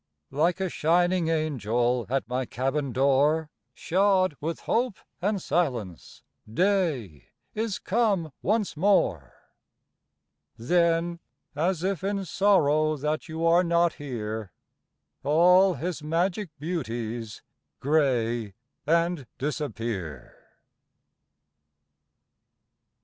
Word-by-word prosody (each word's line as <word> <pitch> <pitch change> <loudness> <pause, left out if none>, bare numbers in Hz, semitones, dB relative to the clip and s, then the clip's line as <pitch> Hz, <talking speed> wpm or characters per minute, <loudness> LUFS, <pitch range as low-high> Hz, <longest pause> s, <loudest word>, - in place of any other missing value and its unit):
Like 170 +6 +1
a 190 - 0
shining 175 +1 +2
angel 125 -7 0
At 135 -2 -1
my 125 +1 -2
cabin 135 +2 -2
door, 140 +5 +2 0.2
Shod 185 -2 +2
with 165 +2 -3
hope 240 -2 0 0.2
and 205 +2 0
silence, 125 - -2 0.3
Day 155 - 0 0.3
is 220 -2 -2
come 200 -7 0
once 210 -1 0
more. 150 - +1 1.2
Then, 170 +5 +1 0.4
as 170 +3 0
if 190 -3 -1
in 200 0 -1
sorrow 155 -5 +2
That 150 +3 -2
you 160 +1 -2
are 170 +2 +5
not 170 -1 +2
here, 110 -7 -5 0.7
All 180 +6 +5
his 160 +3 -4
magic 175 +5 -1
beauties 120 - -4 0.4
Gray 120 -8 +1 0.3
and 170 -4 +1
disappear. 115 - -4
155 Hz, 90 wpm, -26 LUFS, 125-180 Hz, 1.2 s, are